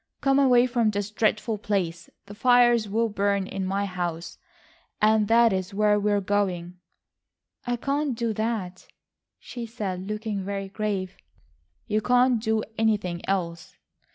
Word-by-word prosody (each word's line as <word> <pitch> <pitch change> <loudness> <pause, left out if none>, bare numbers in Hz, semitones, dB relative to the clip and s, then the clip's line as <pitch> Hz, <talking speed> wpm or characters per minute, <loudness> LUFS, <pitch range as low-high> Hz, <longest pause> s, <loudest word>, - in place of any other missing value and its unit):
Come 275 0 +3
away 250 -3 +5
from 240 -3 +1
this 205 0 -3
dreadful 215 0 0
place. 180 -6 -2 0.2
The 200 - -10
fires 240 -1 +4
will 225 +3 +1
burn 200 -2 0
in 190 0 -4
my 200 +1 -1
house, 175 -3 -5 0.6
and 215 0 +3
that 230 -1 +5
is 190 0 -3
where 210 0 +3
we 210 +1 0
are 205 - +2
going." 185 -3 -2 0.9
"I 245 - +1
can't 280 +2 -1
do 230 -2 -1
that," 215 -4 -3 0.5
she 240 -2 -8
said, 195 -4 -5
looking 210 -2 -3
very 195 0 -4
grave. 200 -3 -3 0.7
"You 215 +1 0
can't 250 0 +3
do 220 -1 0 0.2
anything 205 -6 0
else." 170 -4 -3
210 Hz, 145 wpm, -25 LUFS, 195-230 Hz, 0.9 s, away